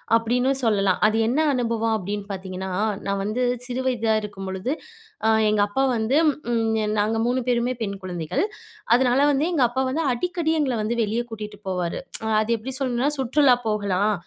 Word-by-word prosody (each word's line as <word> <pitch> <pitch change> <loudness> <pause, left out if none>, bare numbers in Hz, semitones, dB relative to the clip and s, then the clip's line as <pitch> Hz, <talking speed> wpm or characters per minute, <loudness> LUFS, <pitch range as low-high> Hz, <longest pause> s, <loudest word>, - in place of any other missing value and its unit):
அப்படீன்னும் 250 +4 +1
சொல்லலாம். 200 -4 +2
அது 220 +1 +1
என்ன 255 +7 +1
அனுபவம் 230 -2 0
அப்படீன்னு 205 +1 -4
பார்த்தீங்கன்னா, 190 -1 -5 0.3
நான் 200 0 -1
வந்து 215 +5 -1 0.2
சிறு 255 +1 -3
வயதா 225 -3 +1
இருக்கும்பொழுது, 195 +3 -4 0.5
அ - - +4 0.2
எங்க 210 -1 +2
அப்பா 265 +7 0
வந்து 225 +6 +1 0.4
ம். 230 - +1 0.4
நாங்க 215 +2 +1
3 250 +1 +1
பேருமே 245 +1 +1
பெண் 200 -1 -3
குழந்தைகள். 175 - -2 0.5
அதனால 250 +1 +3
வந்து 285 +2 +1
எங்க 290 -6 +3
அப்பா 260 +2 -1
வந்து, 320 +5 -1
அடிக்கடி 335 +4 -1
எங்கள 265 -3 0
வந்து 230 +3 -1
வெளிய 220 +3 -1
கூட்டிட்டு 210 -2 -7
போவாரு. 180 -2 -2 0.4
அது 215 - -3
எப்படி 255 +5 -6
சொல்லணும்னா, 260 +2 0
சுற்றுலா 265 0 +4
போகலாம். 205 -1 +1
225 Hz, 160 wpm, -23 LUFS, 205-255 Hz, 0.5 s, அ